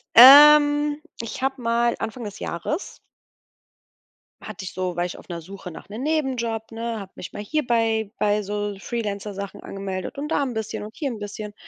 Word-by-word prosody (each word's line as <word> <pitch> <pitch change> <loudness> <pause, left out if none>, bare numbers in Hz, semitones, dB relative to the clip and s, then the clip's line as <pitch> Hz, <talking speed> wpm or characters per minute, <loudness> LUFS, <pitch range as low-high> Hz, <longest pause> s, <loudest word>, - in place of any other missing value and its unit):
Ähm, 290 +3 +9 0.2
ich 230 +2 -6
habe 270 -1 -1
mal 235 0 +1
Anfang 235 +2 -5
des 205 -1 -7
Jahres 290 - -4 1.4
hatte 205 -2 -8
ich - - -7
so 185 -1 -3
war 175 0 0
ich 180 - -6
auf - - -15
'ner 170 -1 -5
Suche 190 +1 -9
nach 160 - -12
'nem 225 +6 -6
Nebenjob, 240 -8 -1
ne, 230 0 -4
habe 195 -1 -9
mich 175 - -9
mal 205 - -5
hier 300 +6 -1
bei 225 -3 +1
bei 210 0 +2
so 205 0 -3
Freelancer-Sachen 200 -3 -5
angemeldet 195 +6 -5
und 300 - -3
da 290 - +1
'n 255 -3 -3
bisschen 220 -1 -4
und 215 +2 -10
hier 285 -3 -2
'n 230 - -5
bisschen. 205 0 -6
220 Hz, 185 wpm, -23 LUFS, 200-260 Hz, 1.4 s, Ähm